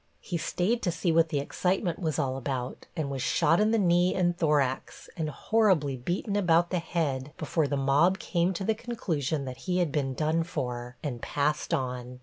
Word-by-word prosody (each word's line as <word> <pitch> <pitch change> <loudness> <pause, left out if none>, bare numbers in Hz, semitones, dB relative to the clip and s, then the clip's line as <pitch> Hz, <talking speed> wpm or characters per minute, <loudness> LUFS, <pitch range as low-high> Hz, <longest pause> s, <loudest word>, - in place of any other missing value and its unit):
He - - -5
stayed 180 +8 0
to 175 - 0
see 170 +1 0
what 165 0 +4
the 155 - -1
excitement 175 +4 -1
was 160 -4 -1
all 130 -1 0
about, 130 -1 -4
and 145 -3 -2
was 135 -1 -3
shot 165 +5 +3
in 215 +1 +3
the 225 - +3
knee 180 -2 +3
and 175 -2 +2
thorax 145 -6 0
and 160 -2 -2
horribly 180 -6 +2
beaten 175 - -2
about 175 -3 +3
the 180 - +1
head 150 -5 -2
before 155 0 0
the 140 - -1
mob 145 +7 +3
came 175 -1 0
to 190 - -4
the 220 - +2
conclusion 160 - -2
that 130 -1 -6
he 180 - +2
had 175 -5 +1
been 135 -3 -1
done 155 +3 +1
for, 125 -6 -4
and 125 -6 -4
passed 150 +1 -1
on. 125 -1 -2
160 Hz, 195 wpm, -28 LUFS, 135-175 Hz, -, what